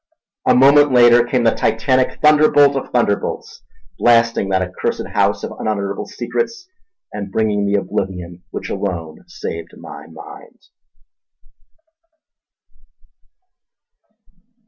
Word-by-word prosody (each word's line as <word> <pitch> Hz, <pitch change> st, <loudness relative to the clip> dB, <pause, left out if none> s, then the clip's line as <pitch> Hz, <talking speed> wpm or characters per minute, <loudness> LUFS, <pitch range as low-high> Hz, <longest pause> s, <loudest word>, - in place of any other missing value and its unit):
A -, -, +5 dB
moment 140 Hz, +2 st, +5 dB
later 120 Hz, -1 st, +6 dB
came 125 Hz, 0 st, 0 dB
the 115 Hz, -, +4 dB
titanic 130 Hz, +3 st, 0 dB
thunderbolt 150 Hz, -2 st, +5 dB
of 135 Hz, -, -4 dB
thunderbolts; 115 Hz, -5 st, -2 dB, 0.4 s
blasting 115 Hz, -4 st, +2 dB
that 95 Hz, -1 st, +1 dB
accursed 90 Hz, 0 st, -4 dB
house -, -, 0 dB
of -, -, -5 dB
unutterable 100 Hz, -2 st, -3 dB
secrets 455 Hz, -5 st, -4 dB, 0.5 s
and 100 Hz, -2 st, -6 dB
bringing 105 Hz, -1 st, 0 dB
the 100 Hz, -, 0 dB
oblivion 90 Hz, -3 st, -4 dB
which -, -, -7 dB
alone 85 Hz, -5 st, -5 dB
saved 80 Hz, 0 st, -8 dB
my -, -, -11 dB
mind. -, -, -13 dB
110 Hz, 100 wpm, -18 LUFS, 95-130 Hz, 0.5 s, later